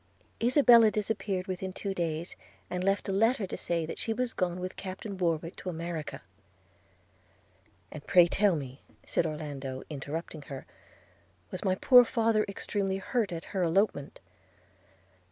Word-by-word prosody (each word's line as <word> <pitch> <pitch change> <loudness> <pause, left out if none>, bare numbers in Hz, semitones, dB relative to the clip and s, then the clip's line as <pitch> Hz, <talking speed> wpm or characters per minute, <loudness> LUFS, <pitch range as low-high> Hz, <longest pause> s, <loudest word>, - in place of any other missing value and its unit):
Isabella 240 -2 +7
disappeared 205 -3 -2
within 185 0 -4
two 195 0 -3
days, 170 -1 -3 0.4
and 180 0 -2
left 195 +1 +1
a - - -1
letter 225 +2 +2
to - - -5
say 170 -2 -1
that 160 - -6
she 225 - 0
was 250 0 -2
gone 180 -1 -1
with 185 +1 -5
Captain 195 +2 -6
Warwick 170 -2 -1
to 185 - -5
America.' 165 -2 -5 1.7
'And 150 - -8
pray 175 -1 +7
tell 195 +1 +2
me,' 135 -2 -6 0.2
said 165 - +1
Orlando, 145 -4 -5
interrupting 150 +2 -5
her, 135 -2 -7 0.9
'was - - -5
my 185 -1 +2
poor 250 +5 +7
father 225 -2 +2
extremely 195 -1 -2
hurt 215 0 -1
at 165 -1 -5
her 190 - 0
elopement?' 170 -4 +1
185 Hz, 145 wpm, -29 LUFS, 165-205 Hz, 1.7 s, Isabella